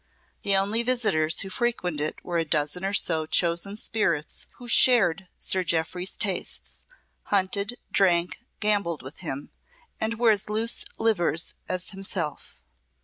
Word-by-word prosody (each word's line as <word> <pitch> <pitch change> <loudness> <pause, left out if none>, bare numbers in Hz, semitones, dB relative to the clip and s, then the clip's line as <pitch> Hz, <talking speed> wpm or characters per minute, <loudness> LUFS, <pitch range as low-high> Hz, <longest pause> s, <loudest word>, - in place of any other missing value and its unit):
The 200 -1 +2
only 205 +4 +2
visitors 215 -11 +2
who 195 - -6
frequented 185 -10 -1
it 155 - -4
were 175 -1 -1
a - - +2
dozen 155 +3 -1
or 195 - 0
so 160 -5 +2
chosen 170 +5 +1
spirits 170 -9 -2
who 245 - -11
shared 195 -8 +4
Sir 185 -1 +2
Jeoffry's 175 +2 0
tastes 195 -3 -3 0.4
hunted, 200 +4 0
drank, 175 -2 +2 0.2
gambled 200 -7 +1
with 130 +4 -10
him, 145 -5 -5 0.5
and 225 +1 -1
were 235 -1 +5
as 210 0 +1
loose 220 +2 -1
livers 175 -7 +1 0.2
as 185 0 -3
himself. 190 -6 -5
190 Hz, 140 wpm, -26 LUFS, 170-215 Hz, 0.5 s, were